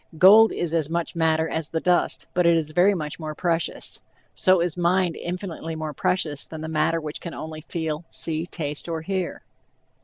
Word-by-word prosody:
Gold 210 Hz, +6 st, +8 dB
is 170 Hz, -2 st, -2 dB
as 160 Hz, -3 st, 0 dB
much 170 Hz, +1 st, -2 dB
matter 160 Hz, -1 st, +2 dB
as 160 Hz, -2 st, -3 dB
the 165 Hz, -, -1 dB
dust, 180 Hz, +1 st, +1 dB
but 180 Hz, -1 st, +3 dB
it 170 Hz, -1 st, +5 dB
is 155 Hz, -1 st, -2 dB
very 185 Hz, +5 st, +4 dB
much 150 Hz, -3 st, -5 dB
more 155 Hz, -1 st, -5 dB
precious; 170 Hz, 0 st, -1 dB, 0.3 s
so 185 Hz, -1 st, +4 dB
is 170 Hz, -2 st, 0 dB
mind 175 Hz, -1 st, +1 dB
infinitely 175 Hz, -2 st, -5 dB
more 155 Hz, -1 st, -4 dB
precious 150 Hz, -1 st, 0 dB
than 160 Hz, -1 st, -8 dB
the 160 Hz, -, -4 dB
matter 160 Hz, +1 st, +1 dB
which 150 Hz, -1 st, -6 dB
can 170 Hz, -, -6 dB
only 155 Hz, 0 st, -7 dB
feel, 160 Hz, 0 st, -4 dB
see, 160 Hz, +1 st, 0 dB
taste 150 Hz, -1 st, -4 dB
or 165 Hz, -1 st, -2 dB
hear. 185 Hz, -1 st, -3 dB
165 Hz, 190 wpm, -24 LUFS, 155-175 Hz, 0.3 s, Gold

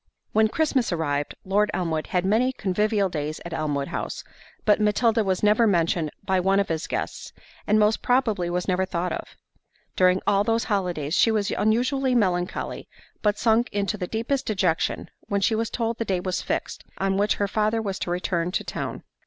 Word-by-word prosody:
When 220 Hz, 0 st, +4 dB
Christmas 265 Hz, -2 st, 0 dB
arrived, 145 Hz, -4 st, -1 dB
Lord 205 Hz, +2 st, +2 dB
Elmwood 160 Hz, -3 st, -1 dB
had 180 Hz, 0 st, 0 dB
many 225 Hz, +6 st, +3 dB
convivial 210 Hz, -1 st, +1 dB
days 155 Hz, -3 st, -4 dB
at 170 Hz, -, -6 dB
Elmwood 145 Hz, -3 st, -2 dB
House, -, -, -4 dB, 0.4 s
but 210 Hz, 0 st, +4 dB
Matilda 220 Hz, +2 st, +3 dB
was 190 Hz, -1 st, -1 dB
never 215 Hz, +2 st, +4 dB
mentioned 170 Hz, -4 st, +1 dB, 0.2 s
by 190 Hz, -1 st, +2 dB
one 195 Hz, +2 st, +3 dB
of 200 Hz, -, 0 dB
his 165 Hz, 0 st, -2 dB
guests, -, -, -4 dB, 0.4 s
and 210 Hz, -, +4 dB
most 210 Hz, +1 st, +3 dB
probably 225 Hz, -8 st, +1 dB
was 180 Hz, 0 st, -2 dB
never 185 Hz, 0 st, +1 dB
thought 180 Hz, -1 st, -2 dB
of. -, -, -6 dB, 0.6 s
During 185 Hz, 0 st, +4 dB
all 200 Hz, 0 st, +3 dB
those 225 Hz, +2 st, +1 dB
holidays, 175 Hz, -8 st, -1 dB
she 225 Hz, -, +4 dB
was 215 Hz, -3 st, 0 dB
unusually 250 Hz, +4 st, +1 dB
melancholy, 180 Hz, -5 st, -1 dB, 0.3 s
but 210 Hz, -1 st, +1 dB
sunk 230 Hz, +2 st, +2 dB
into 205 Hz, +1 st, -1 dB
the 185 Hz, -3 st, -4 dB
deepest 230 Hz, +6 st, -2 dB
dejection 185 Hz, -6 st, 0 dB, 0.2 s
when 200 Hz, -, 0 dB
she 210 Hz, -, +2 dB
was 225 Hz, +1 st, 0 dB
told 230 Hz, -1 st, -2 dB
the -, -, +1 dB
day 190 Hz, -3 st, 0 dB
was 185 Hz, 0 st, -2 dB
fixed, -, -, -3 dB
on 195 Hz, 0 st, 0 dB
which 205 Hz, +1 st, +2 dB
her 200 Hz, -, 0 dB
father 215 Hz, +2 st, +1 dB
was 200 Hz, -3 st, -3 dB
to -, -, -3 dB
return 175 Hz, -1 st, -1 dB
to -, -, 0 dB
town. -, -, -5 dB
200 Hz, 185 wpm, -25 LUFS, 180-220 Hz, 0.6 s, When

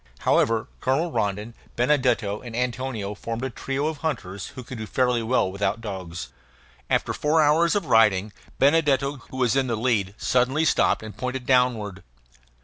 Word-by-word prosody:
However, 115 Hz, -1 st, +2 dB
Colonel 150 Hz, +7 st, 0 dB
Rondon, 105 Hz, +1 st, -2 dB, 0.2 s
Benedetto, 120 Hz, -6 st, +1 dB
and 120 Hz, -3 st, -8 dB
Antonio 125 Hz, -4 st, -2 dB
formed 115 Hz, +3 st, -5 dB
a 130 Hz, -, -2 dB
trio 135 Hz, +4 st, -3 dB
of 155 Hz, -1 st, -2 dB
hunters 115 Hz, -, -4 dB
who 130 Hz, -, -9 dB
could 125 Hz, 0 st, -8 dB
do 110 Hz, -, -5 dB
fairly 125 Hz, -1 st, +1 dB
well 115 Hz, -4 st, +1 dB
without 100 Hz, +2 st, -1 dB
dogs. 90 Hz, -, -6 dB, 0.6 s
After -, -, +1 dB
four 155 Hz, +2 st, +1 dB
hours 160 Hz, +4 st, +4 dB
of 205 Hz, -, 0 dB
riding, 105 Hz, -4 st, +3 dB, 0.2 s
Benedetto, 140 Hz, -1 st, +3 dB
who 130 Hz, -, -8 dB
was 125 Hz, -1 st, +2 dB
in 135 Hz, -1 st, +2 dB
the 115 Hz, -, 0 dB
lead, 105 Hz, -5 st, 0 dB
suddenly 130 Hz, +5 st, +1 dB
stopped 150 Hz, -, +2 dB
and 110 Hz, -1 st, -8 dB
pointed 125 Hz, 0 st, -4 dB
downward. 120 Hz, -7 st, +1 dB
125 Hz, 160 wpm, -24 LUFS, 105-135 Hz, 0.6 s, hours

